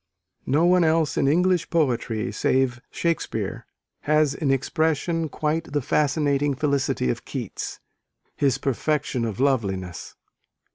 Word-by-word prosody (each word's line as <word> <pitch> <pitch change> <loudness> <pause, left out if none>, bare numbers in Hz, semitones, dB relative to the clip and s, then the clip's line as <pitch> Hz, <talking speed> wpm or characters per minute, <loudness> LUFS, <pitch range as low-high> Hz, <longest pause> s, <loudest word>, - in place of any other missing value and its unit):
"No 150 +6 +3
one 180 0 +5
else 160 -1 +2
in 140 - +2
English 180 +3 +2
poetry, 120 -8 0
save 130 -2 +1
Shakespeare, 170 -2 -2 0.4
has 155 -2 +4
in 145 - -2
expression 160 +4 0
quite 155 +1 -2
the 145 - +1
fascinating 145 0 +1
felicity 140 - 0
of - - -5
Keats, - - -5 0.6
his 140 -3 +2
perfection 135 -2 -1
of 110 -2 -4
loveliness." 100 -10 -1
145 Hz, 115 wpm, -24 LUFS, 130-160 Hz, 0.6 s, one